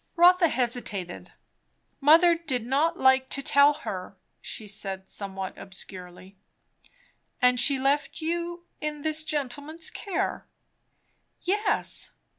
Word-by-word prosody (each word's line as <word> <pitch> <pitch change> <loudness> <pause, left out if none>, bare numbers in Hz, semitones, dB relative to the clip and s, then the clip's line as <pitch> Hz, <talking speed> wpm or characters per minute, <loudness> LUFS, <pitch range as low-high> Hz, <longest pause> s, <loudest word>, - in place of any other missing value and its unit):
Rotha 355 0 +6
hesitated. 235 - -2 0.7
"Mother 330 +4 +6
did 290 -9 -2
not 295 +7 +1
like 265 0 +4
to 275 - -3
tell 285 +2 +5
her," 185 0 -5 0.2
she 215 - -6
said, 195 -2 -5
somewhat 195 -2 -5
obscurely. 185 0 -8 1.0
"And 250 0 +4
she 275 +3 +3
left 275 +2 0
you 345 +1 -3
in 300 -1 -4
this 315 0 -1
gentleman's 295 +2 -3
care." 400 -3 -3 0.9
"Yes." 410 +4 0
275 Hz, 105 wpm, -27 LUFS, 210-320 Hz, 1.0 s, Rotha